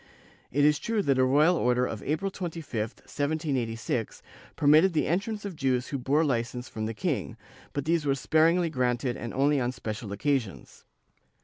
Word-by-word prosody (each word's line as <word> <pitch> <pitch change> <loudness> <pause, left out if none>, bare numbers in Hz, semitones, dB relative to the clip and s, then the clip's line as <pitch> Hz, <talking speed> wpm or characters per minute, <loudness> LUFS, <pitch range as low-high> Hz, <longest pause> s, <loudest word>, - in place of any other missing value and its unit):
^ - - -27 0.5
It 145 +3 +3
is 150 -1 +4
true 225 -3 -1
that 135 -4 +2
a - - +5
royal 150 +7 +4
order 125 -4 +2
of 110 -4 -5
April 190 +6 -1
25, 170 -6 -6
1786, 120 0 -2 0.3
permitted 155 +5 +5
the 155 - +1
entrance 205 +5 -2
of 195 -4 -5
Jews 130 -3 0
who 140 - -3
bore 140 +5 +2
Ucence 125 -2 -2
from 110 0 -4
the 115 - -5
king, - - -2 0.4
but 145 -1 -3
these 165 0 +1
were 140 -2 +1
sparingly 165 +5 +2
granted 125 -2 0
and 120 - -6
only 140 +2 +2
on 125 -1 0
special 110 -3 -6
occasions. 120 - -2
140 Hz, 175 wpm, -28 LUFS, 125-160 Hz, 0.5 s, a